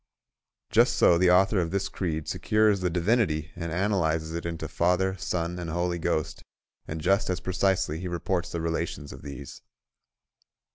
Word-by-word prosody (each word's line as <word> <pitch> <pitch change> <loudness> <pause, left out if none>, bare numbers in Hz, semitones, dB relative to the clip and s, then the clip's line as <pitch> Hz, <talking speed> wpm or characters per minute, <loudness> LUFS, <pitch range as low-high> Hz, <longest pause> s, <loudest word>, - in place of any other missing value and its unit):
Just - - +4
so 85 - +5
the 90 0 +4
author 95 +2 +4
of 85 -2 0
this 100 +2 -1
creed 80 -6 -3
secures 105 -2 +2
the 90 -1 0
Divinity 85 -3 +1
and 85 -1 -5
analyses 80 -4 0
it 85 0 -3
into 80 -2 -4
Father, 90 +4 +1
Son, 90 -1 -2
and 85 -2 -5
Holy 85 +1 -1
Ghost, 80 -1 -2 0.5
and 80 - -4
just 95 +6 +1
as 90 0 -1
precisely 95 -3 0
he 90 - -4
reports 90 0 -2
the 85 - -3
relations 80 -3 -3
of - - -11
these. 70 -1 -9
85 Hz, 160 wpm, -27 LUFS, 80-95 Hz, 0.5 s, so